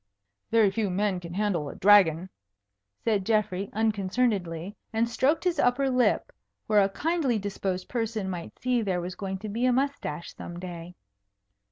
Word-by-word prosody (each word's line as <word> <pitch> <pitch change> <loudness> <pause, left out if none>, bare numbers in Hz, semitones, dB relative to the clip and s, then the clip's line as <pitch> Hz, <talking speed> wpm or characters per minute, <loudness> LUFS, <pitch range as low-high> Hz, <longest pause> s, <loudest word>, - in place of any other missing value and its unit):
"Very 220 -3 +4
few 210 0 -1
men 190 0 0
can 170 0 -8
handle 190 -8 0
a - - -8
dragon," 185 -4 +5 0.8
said 210 -4 +1
Geoffrey, 200 -2 0
unconcernedly, 200 -4 0 0.2
and 225 +1 +1
stroked 265 +7 +1
his 360 -2 0
upper 265 +2 +2
lip, 250 -1 +2 0.3
where 210 -1 +4
a 195 - +3
kindly 300 - 0
disposed 195 -2 -3
person 225 -4 -2
might 175 -3 -6
see 250 -1 +1
there 190 -4 -1
was 180 +1 -4
going 190 0 -4
to 215 +3 -7
be 225 +4 -3
a - - +4
moustache 260 - -2
some 175 - -8
day. 175 -1 -8
205 Hz, 160 wpm, -27 LUFS, 185-230 Hz, 0.8 s, dragon